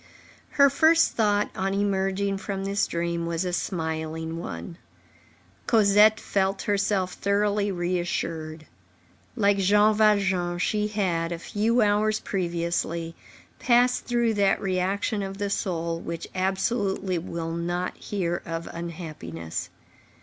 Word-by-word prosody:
Her 280 -1 +6
first 320 +3 +4
thought 210 -2 +1
on 195 +1 -1
emerging 195 0 0
from 195 -1 -4
this 200 +1 0
dream 170 0 -2
was 170 +2 -1
a 180 - -2
smiling 160 -1 -3
one. 85 - -7 0.9
Cosette 215 0 +5
felt 195 0 -1
herself 200 -2 0
thoroughly 205 0 +1
reassured. 170 -3 -3 0.7
Like 200 -4 +2
Jean 210 +3 +4
Valjean, 195 -5 +2
she 210 +4 0
had, 180 -6 -1
a 170 - -2
few 220 +7 +1
hours 210 +1 +2
previously, 170 -2 -2 0.5
passed 245 0 +3
through 235 -2 +1
that 200 -2 +2
reaction 195 +3 -1
of 195 0 -5
the 205 -1 -2
soul 170 -4 -2
which 170 0 -5
absolutely 190 -1 0
will 165 -1 -5
not 175 +2 -2
hear 175 -4 -2
of 165 0 -5
unhappiness. 90 - -6
190 Hz, 120 wpm, -26 LUFS, 170-205 Hz, 0.9 s, Her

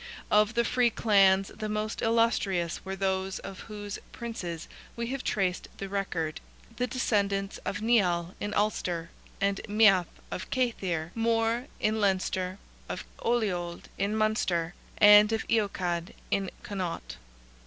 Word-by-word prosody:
Of 210 +2 +4
the 235 0 +3
free 245 +1 +3
clans, 195 -4 +4
the 215 -1 -5
most 215 +1 -2
illustrious 215 -7 +1
were 190 0 -4
those 190 0 -1
of 195 -1 -8
whose 205 -2 -6
Princes 180 -9 -5 0.3
we 235 - -2
have 275 -1 -3
traced 190 -3 0
the 195 - -5
record—the 195 +5 -4
descendants 200 -5 0
of 210 - -3
Nial 180 -7 +2
in 205 - -3
Ulster 180 -5 -1 0.3
and 200 0 +1
Meath, 200 -5 +5 0.2
of 185 - -5
Cathaeir 185 -10 -1
More 230 +2 +1
in 215 +1 +1
Leinster, 185 -1 0 0.3
of - - -4 0.2
Oliold 185 -8 -1 0.2
in 200 +2 0
Munster, 185 -6 +1 0.2
and 210 0 +8
of 225 0 -1
Eochaid 185 -6 0 0.2
in 195 -1 +1
Connaught. 185 -4 -4
200 Hz, 130 wpm, -29 LUFS, 185-220 Hz, 0.3 s, and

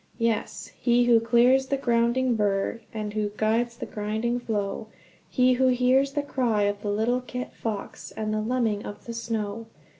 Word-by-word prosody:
Yes, 230 -2 -2
he 240 0 +4
"Who 240 -1 +5
clears 245 +3 +4
the 275 - 0
grounding 240 0 +2
berg 205 +1 0
And 210 -2 -4 0.2
guides 235 +2 +1
the - - -5
grinding 220 +3 -2
floe, 210 -2 -3 0.4
He 255 0 +3
hears 260 +2 +3
the 290 - -1
cry 240 -7 0
of 205 0 -1
the 205 - -3
little 225 +5 +1
kit 250 0 -6
fox 215 -3 -5
And 215 -1 -3
the 215 - 0
lemming 220 -3 0
of 205 0 -9
the 235 - -5
snow!" 225 -1 -4
230 Hz, 160 wpm, -26 LUFS, 215-250 Hz, 0.4 s, Who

